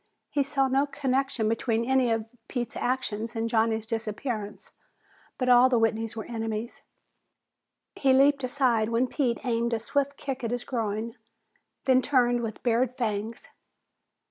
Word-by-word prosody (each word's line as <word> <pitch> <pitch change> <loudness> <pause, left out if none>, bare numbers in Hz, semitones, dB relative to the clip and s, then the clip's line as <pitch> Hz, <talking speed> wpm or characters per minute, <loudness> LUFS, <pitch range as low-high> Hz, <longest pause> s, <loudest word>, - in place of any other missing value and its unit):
He 290 - +1
saw 275 -1 +1
no 270 +2 +2
connection 265 -4 0
between 230 +1 0
any 260 -1 +3
of 225 -1 0 0.2
Pete's 240 -3 -4
actions 235 -3 -2
and 225 0 -1
Johnny's 225 -1 +1
disappearance, 220 -1 -4 0.7
but 255 - -1
all 250 +1 +7
the 250 - +3
Whitneys 225 0 0
were 220 - -5
enemies. 225 0 -4 1.1
He 270 - +2
leaped 275 +1 +4
aside 250 -4 +1
when 235 +2 +2
Pete 250 -2 -1
aimed 235 -1 0
a - - -2
swift 280 +4 -1
kick 265 -2 -5
at 230 - -1
his 245 +1 -2
groin, 225 -2 -3 0.7
then 260 -1 +5
turned 245 -3 +2
with 225 -2 -5
bared 245 +1 +1
fangs. 220 -2 -3
240 Hz, 145 wpm, -27 LUFS, 225-260 Hz, 1.1 s, all